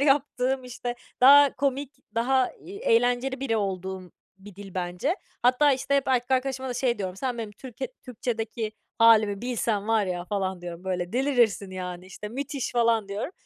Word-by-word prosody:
yaptığım, 270 -2 +2
işte, 245 -1 -5 0.3
daha 280 +2 +8
komik, 275 +1 -1 0.2
daha, 255 +2 +2
iii, 395 +3 -11
eğlenceli 245 - +2
biri 260 -5 0
olduğum 190 -2 -3 0.3
bir 200 0 -13
dil 195 -2 -10
bence. 180 - -1 0.3
Hatta, 255 +4 +5
işte, 270 +2 +1
hep 275 - 0
erkek 250 -1 +1
arkadaşıma 265 0 0
da 250 - -3
şey 245 -2 0
diyorum: 185 -2 -4
"Sen, 245 +2 -3
benim 220 -2 -5
Türkiye 255 +3 -7
Türkçedeki 225 -2 -3 0.3
hâlimi 220 -3 +5
bilsen 225 -4 -1
var 220 -3 +3
ya." 175 -1 -3
falan 190 -1 -2
diyorum, 175 0 -8
"Böyle, 180 -1 -2
delirirsin, 245 -6 +2
yani, 180 -1 -6
işte, 200 +2 -8
müthiş!" 275 +3 -4
falan 230 -3 +2
diyorum. 205 - -4
235 Hz, 165 wpm, -26 LUFS, 200-260 Hz, 0.3 s, daha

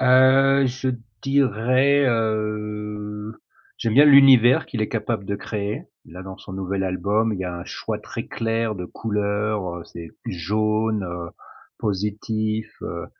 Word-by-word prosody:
Heu, 130 +1 +5
je 130 +1 -2 0.3
dirais, 135 +1 +3
heu, 105 -2 -2 0.5
j'aime 115 -2 -1
bien 145 +3 +8
l'univers 135 -4 +7
qu'il 110 - -3
est 110 - -1
capable 115 -2 -2
de 100 +1 -3
créer. 105 0 -4 0.2
Là, 90 +3 -10
dans 95 0 -8
son 95 - -11
nouvel 95 0 -2
album, 100 +4 0
il 100 - -4
y - - -2
a 90 -1 -4
un 85 - -7
choix - - -4
très - - -7
clair 115 -1 -1
de 90 -3 -6
couleurs, 105 -2 -2
heu, 85 - -8
c'est 85 -1 -10 0.2
jaune, 110 +4 0
heu, 85 -1 -6 0.5
positif, 110 +1 -2
heu, 85 0 -5
105 Hz, 145 wpm, -23 LUFS, 100-115 Hz, 0.5 s, bien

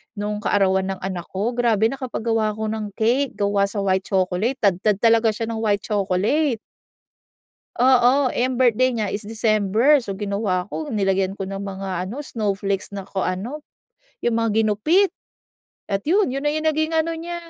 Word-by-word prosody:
nung 210 0 -3
kaarawan 190 -1 +2
ng 185 - -12
anak 185 -3 -4
ko, 200 +5 0
grabe 225 -3 +3
nakapag 260 -3 -5
gawa 220 -2 +1
ako 220 0 -3
ng 220 0 -3
cake 250 +5 +1
gawa 200 0 +1
sa 200 0 -3
white 190 -1 0
chocolate, 190 +6 0
tadtad 200 +1 +2
talaga 225 -1 +4
siya 225 +1 -4
ng 230 - -3
white 205 -2 +1
chocolate. 215 +7 +1 1.2
Oo 255 +2 +4
eh 250 +1 +1
ang 255 - -3
birthday 255 0 +3
niya 220 -3 -1
is 205 - -2
December 220 +5 +3
so 200 -5 -5
ginawa 200 -2 -1
ko 310 - -4
nilagyan 195 -4 0
ko 195 - -4
ng 195 +1 -5
mga 190 -2 -4
ano 285 +7 -6
snowflakes 200 -4 -2
na 195 -1 -5
kung 190 - -4
ano, 210 +11 -4 0.6
yung 235 -1 0
mga 230 -1 +1
ginupit 310 - +3 0.8
at 195 -1 -2
yun, 385 -6 +3
yun 275 - -2
na 295 - 0
yung 310 0 -2
naging 315 +1 +1
ano 325 +1 +1
niya 340 +1 -5
215 Hz, 175 wpm, -22 LUFS, 195-255 Hz, 1.2 s, talaga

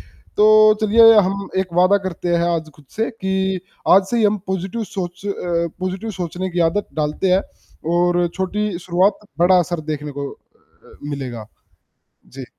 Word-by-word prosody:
तो 215 0 +4
चलिए 225 +2 +6
हम 195 0 0
एक 185 -2 -2
वादा 185 +3 +4
करते 175 0 -3
हैं 170 +1 +1
आज 160 -1 -4
खुद 150 - -19
से 225 +1 -1
कि 190 -3 -2 0.3
आज 190 +2 +7
से 240 - 0
ही 225 - +2
हम 210 0 +2
पॉज़िटिव 190 +4 -3
सोच 180 0 -5
अ, 170 -4 -2
पॉज़िटिव 190 +4 -4
सोचने 185 -1 -4
की 175 0 -2
आदत 205 +4 -3
डालते 155 +4 -1
हैं 190 +2 +3 0.5
और 175 0 +2
छोटी 190 0 -2
शुरुआत, 185 +3 +1 0.2
बड़ा 180 +2 +5
असर 175 -1 -1
देखने 150 0 -5
को 140 0 -5
अ, - - -21
मिलेगा। 125 -6 -6 0.8
जी। 135 0 -10
185 Hz, 160 wpm, -19 LUFS, 170-200 Hz, 0.8 s, आज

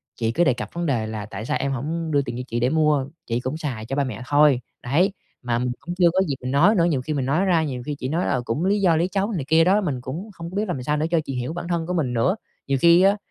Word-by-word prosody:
chị 115 -1 -1
cứ 170 +9 +2
đề 130 - +3
cập 125 - -6
vấn 170 0 -2
đề 120 -8 0
là 110 -2 -5
"Tại 105 +1 -7
sao - - 0
em 140 0 -2
hổng 160 +5 -3
đưa 145 -1 +3
tiền 120 -3 -5
cho 125 - -4
chị 120 - -2
để 120 +2 +2
mua, 150 -2 +2 0.2
chị 115 0 0
cũng 130 +5 -3
xài 130 -9 -4
cho 130 +4 -3
ba 140 - +2
mẹ 125 -3 -5
thôi", 145 -3 +4 0.2
đấy. 170 +11 +2 0.3
Mà 120 -2 -1
mình 125 0 -1
cũng 175 +1 -6
chưa 175 -2 +5
có 190 - +2
dịp 140 - -1
mình 125 0 -3
nói 170 +11 +5
nữa, 170 -4 +3
nhiều 150 -7 +1
khi 155 +5 -3
mình 135 -3 -1
nói 155 +9 +1
ra, 170 -4 +3
nhiều 130 -5 -4
khi 150 - -3
chị 130 -2 -4
nói 165 +5 0
"Ờ, 125 - 0
cũng 145 +10 -1
lý 200 +1 +2
do 175 -4 +4
lý 170 +3 +2
trấu" 200 +2 0
này 165 -10 -3
kia 160 +2 +5
đó, 195 +5 +3
mình 140 -10 -2
cũng 165 - -6
không 170 -2 -7
có - - -8
biết 210 +2 0
làm 140 -9 -3
sao 150 +3 0
nữa 150 - 0
cho 170 - +3
chị 135 - -4
hiểu 125 +5 -3
bản 170 - -5
thân 170 -2 -1
của 180 - -2
mình 145 -8 0
nữa. 120 - +2 0.3
Nhiều 140 -1 +1
khi 170 +1 +7
á, 195 +2 +4
150 Hz, 320 wpm, -23 LUFS, 125-175 Hz, 0.3 s, khi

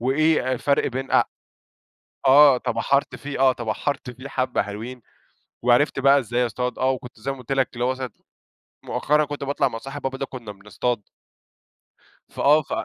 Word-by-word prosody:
وإيه 135 +1 +2
الفرق 140 +3 +1
بين 130 +2 -4
أ - - +5 1.0
آه 140 -1 +8
تبحرت 135 +3 0
فيه، 145 -1 -6
آه 130 -1 +5
تبحرت 125 +4 -3
فيه 130 +3 -10
حبَّة 130 -2 0
حلوين، 115 +5 -7 0.6
وعرفت 125 +4 +3
بقى 140 +1 +5
إزاي 125 0 0
أصطاد 125 +1 -3
آه 130 - +2
وكنت 125 -2 -7
زي 135 +5 -3
ما 135 - -7
قُلت 125 0 -10
لك 135 -1 +2
اللي 120 0 -3
هو 130 - +2
مثلًا 130 -1 -4 0.7
مؤخرًا 150 +1 +1
كنت 145 -1 -5
باطلع 140 0 +1
مع 115 - -6
صاحب 135 +4 -8
بابا 135 0 -3
ده 135 - -3
كنا 115 -6 -8
بنصطاد. 105 +3 -3 1.2
فآه 150 +2 +4
ف 140 - -17
130 Hz, 170 wpm, -23 LUFS, 125-140 Hz, 1.2 s, آه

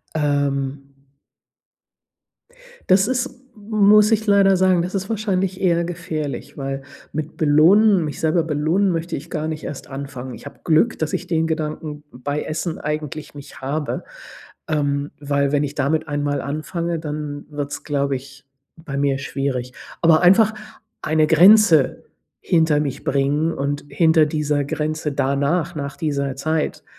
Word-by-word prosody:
Ähm. 140 -2 -1 2.0
Das 190 +3 +4
ist 255 0 -2 0.2
muss 210 0 +4
ich 220 0 +1
leider 200 -2 +5
sagen, 185 -1 +3
das 180 +3 -5
ist 195 0 -2
wahrscheinlich 195 -4 -1
eher 170 -2 +2
gefährlich, 165 -4 -5
weil 135 0 -4 0.3
mit 155 +1 -5
belohnen 175 +6 +5
mich 150 - -5
selber 160 +1 +2
belohnen 160 +6 +1
möchte 170 0 -2
ich 150 +5 -9
gar 155 -1 -3
nicht 155 -1 -5
erst 140 - -7
anfangen. 135 -2 -7
Ich - - -12
habe 140 - -11
Glück, 165 +8 +2
dass 155 -1 -2
ich - - -3
den 160 -2 0
Gedanken 155 -1 -4
bei 145 +4 -3
Essen 160 +1 -3
eigentlich 150 0 -5
nicht 145 -1 -11
habe, 145 +3 -3 0.6
ähm, 145 -1 -1
weil, 140 -1 0
wenn 145 0 +2
ich 145 0 -4
damit 155 +3 0
einmal 145 -1 -1
anfange, 165 +4 -3
dann 150 -2 -5
wird 145 -1 -4
es, - - -6
glaube 140 -2 0
ich, 135 +1 -12 0.3
bei 160 -4 -7
mir 140 -1 +1
schwierig. 135 -3 -3 0.3
Aber 165 -1 +5
einfach 195 +5 +6 0.5
eine 155 0 +2
Grenze 170 -2 +5 0.4
hinter 160 -3 +2
mich 140 -2 -4
bringen 145 +4 +1
und 145 0 -3
hinter 160 +2 +4
dieser 150 -1 0
Grenze 155 +1 -2
danach 140 +5 0
nach 140 -2 -5
dieser 140 -4 -2
Zeit 155 +3 -2
155 Hz, 145 wpm, -21 LUFS, 140-170 Hz, 2.0 s, einfach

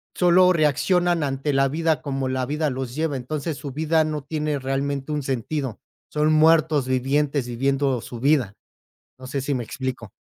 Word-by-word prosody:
sólo 180 +1 +5
reaccionan 175 +2 +2
ante 140 +1 -1
la 135 0 +3
vida 160 +1 0
como 135 -3 -2
la 130 -1 -1
vida 150 +3 -1
los 130 -1 -4
lleva, 155 -3 -1
entonces 150 +4 -4
su 140 - -6
vida 160 +2 +2
no 155 -2 -3
tiene 150 0 -2
realmente 135 +2 -2
un 150 -1 -1
sentido, 135 -1 -3 0.3
son 155 +1 +2
muertos 155 -3 +4
vivientes, 135 +1 0
viviendo 135 +1 0
su 120 - -8
vida, 130 -6 +2 0.6
no 130 - -10
sé, 140 +1 -3
si 135 +1 -1
me 120 - -2
explico. 125 -2 -5
140 Hz, 170 wpm, -23 LUFS, 130-155 Hz, 0.6 s, sólo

